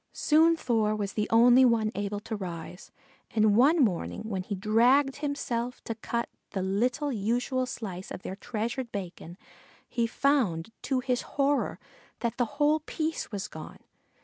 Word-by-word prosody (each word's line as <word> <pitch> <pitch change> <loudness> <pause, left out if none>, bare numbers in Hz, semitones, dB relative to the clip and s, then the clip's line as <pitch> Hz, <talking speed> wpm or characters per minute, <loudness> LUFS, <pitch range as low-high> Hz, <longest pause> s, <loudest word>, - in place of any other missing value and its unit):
Soon 325 +2 +4
Thor 220 -7 +1
was 205 -2 -3
the 210 - -1
only 240 +3 +6
one 230 -3 +3
able 205 0 -3
to 220 +1 -5
rise, 180 -2 -7 0.4
and 215 -2 +4
one 280 +9 +5
morning 195 +1 -3
when 200 -4 -3
he 200 +2 -4
dragged 240 +8 +3
himself 250 -4 -3
to 230 - -3
cut 235 +1 -3 0.3
the 190 - -1
little 245 +9 0
usual 245 +4 0
slice 195 -6 -6
of - - -7
their 190 - -5
treasured 235 +4 -4
bacon 180 -3 -7 0.5
he 235 -1 0
found, 225 - +1
to 260 -2 0
his 250 -1 0 0.2
horror, 280 0 +1 0.4
that 235 -2 -2
the 245 - +2
whole 300 +1 +3
piece 315 -1 -3
was 205 -1 -4
gone. 160 -5 -9
230 Hz, 155 wpm, -28 LUFS, 205-260 Hz, 0.5 s, only